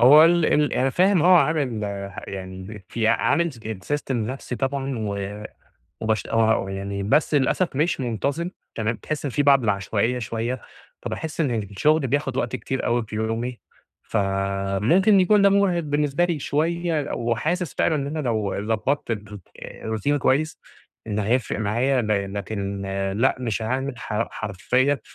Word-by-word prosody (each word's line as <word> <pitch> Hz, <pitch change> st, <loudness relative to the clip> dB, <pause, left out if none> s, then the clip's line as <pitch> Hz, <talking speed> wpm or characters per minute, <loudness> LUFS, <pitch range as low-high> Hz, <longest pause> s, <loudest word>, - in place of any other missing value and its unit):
هو 145 Hz, +6 st, +9 dB
ال 170 Hz, -1 st, +4 dB
ال 150 Hz, 0 st, +2 dB
أنا 130 Hz, +1 st, +2 dB
فاهم 185 Hz, +1 st, +3 dB
هو 180 Hz, +1 st, +7 dB
عامل 140 Hz, -8 st, +1 dB, 0.5 s
يعني 95 Hz, +1 st, -7 dB
في 110 Hz, -1 st, 0 dB
عامل 170 Hz, +7 st, +2 dB
sy 120 Hz, -, -14 dB, 0.3 s
system 145 Hz, -2 st, -1 dB
لنفسي 125 Hz, +1 st, -3 dB
طبعًا 135 Hz, -2 st, -2 dB
و 100 Hz, 0 st, -4 dB, 0.6 s
وبش 110 Hz, -2 st, 0 dB, 0.4 s
يعني 100 Hz, +1 st, -4 dB
بس 145 Hz, +8 st, +2 dB
للأسف 145 Hz, +3 st, +1 dB
مش 155 Hz, +1 st, +1 dB
منتظم 140 Hz, -, -2 dB, 0.2 s
تمام، 110 Hz, 0 st, -1 dB
تحس 150 Hz, +7 st, -4 dB
في 145 Hz, +2 st, 0 dB
بعض 140 Hz, -2 st, +5 dB
العشوائية 105 Hz, +4 st, 0 dB
شوية، 115 Hz, +2 st, -3 dB, 0.4 s
فباحس 160 Hz, +1 st, -4 dB
إن 145 Hz, -, +2 dB
الشغل 135 Hz, +9 st, +1 dB
بياخد 135 Hz, 0 st, -1 dB
وقت 130 Hz, -, -1 dB
كتير 130 Hz, +4 st, -3 dB
أوي 120 Hz, -1 st, +1 dB
في 110 Hz, -, -6 dB
يومي 115 Hz, +2 st, -2 dB, 0.4 s
فممكن 100 Hz, -, +2 dB
يكون 200 Hz, +2 st, +4 dB
ده 200 Hz, -, +7 dB
مُرهق 195 Hz, -3 st, +3 dB
بالنسبة 150 Hz, +2 st, +1 dB
لي 170 Hz, -4 st, -1 dB
شوية، 160 Hz, +1 st, -1 dB
وحاسس 145 Hz, +8 st, -1 dB
فعلًا 160 Hz, -, +2 dB
إن 140 Hz, -1 st, -2 dB
أنا 155 Hz, +2 st, -3 dB
لو 110 Hz, -6 st, -1 dB, 0.2 s
ضبطت 125 Hz, +4 st, -1 dB
الر 105 Hz, -2 st, -4 dB, 0.3 s
الروتين 110 Hz, +7 st, -2 dB
كويس 150 Hz, +5 st, +1 dB, 0.5 s
إن 105 Hz, -1 st, -2 dB
هيفرق 115 Hz, +2 st, 0 dB
معايا 120 Hz, +5 st, +1 dB
ل 100 Hz, -2 st, -1 dB
لكن 100 Hz, -1 st, -4 dB, 0.3 s
لأ 130 Hz, +4 st, +3 dB
مش 115 Hz, -2 st, -2 dB
هاعمل 130 Hz, +2 st, -2 dB
ح 110 Hz, +1 st, -2 dB
حرفيًا 125 Hz, +7 st, 0 dB
125 Hz, 150 wpm, -24 LUFS, 105-150 Hz, 0.6 s, هو